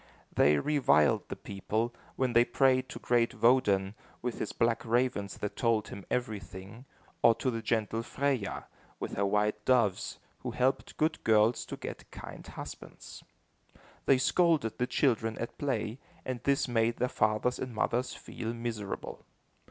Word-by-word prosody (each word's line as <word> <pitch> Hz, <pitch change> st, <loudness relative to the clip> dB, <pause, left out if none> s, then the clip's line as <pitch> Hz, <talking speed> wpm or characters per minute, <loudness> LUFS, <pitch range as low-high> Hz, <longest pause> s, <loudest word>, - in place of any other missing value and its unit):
They 75 Hz, +1 st, +5 dB
reviled 75 Hz, -, +3 dB
the -, -, -4 dB
people, 110 Hz, +4 st, -2 dB, 0.2 s
when 130 Hz, -2 st, 0 dB
they 120 Hz, +1 st, +7 dB
prayed 130 Hz, +1 st, +2 dB
to -, -, -7 dB
great 120 Hz, -1 st, +1 dB
Woden, 105 Hz, -6 st, +3 dB, 0.3 s
with 125 Hz, -1 st, -3 dB
his -, -, -2 dB
black 115 Hz, -1 st, +1 dB
ravens 115 Hz, -4 st, 0 dB
that 105 Hz, -, -4 dB
told 115 Hz, -3 st, +1 dB
him 100 Hz, -, -9 dB
everything, 110 Hz, -1 st, -4 dB, 0.4 s
or 115 Hz, -, +6 dB
to 130 Hz, -, -1 dB
the 115 Hz, -1 st, -3 dB
gentle 110 Hz, 0 st, 0 dB
Freya, 130 Hz, -4 st, -1 dB, 0.3 s
with -, -, -4 dB
her 100 Hz, 0 st, +1 dB
white 105 Hz, +1 st, +1 dB
doves, 115 Hz, -6 st, +2 dB, 0.2 s
who -, -, -4 dB
helped 130 Hz, +1 st, 0 dB
good 155 Hz, +1 st, 0 dB
girls 110 Hz, +2 st, +3 dB
to -, -, -6 dB
get -, -, -7 dB
kind -, -, -10 dB
husbands. -, -, -9 dB, 0.8 s
They 135 Hz, -, +6 dB
scolded 155 Hz, -3 st, +2 dB
the 125 Hz, -, +1 dB
children 115 Hz, -4 st, +1 dB
at 115 Hz, -, -6 dB
play, 120 Hz, -4 st, -2 dB, 0.3 s
and 125 Hz, -2 st, -3 dB
this 140 Hz, -1 st, +2 dB
made 115 Hz, -1 st, +1 dB
their 125 Hz, -, +1 dB
fathers 110 Hz, +2 st, +1 dB
and 125 Hz, -3 st, -5 dB
mothers 120 Hz, +3 st, 0 dB
feel 115 Hz, +1 st, -5 dB
miserable. 115 Hz, -4 st, -5 dB
115 Hz, 150 wpm, -30 LUFS, 105-125 Hz, 0.8 s, they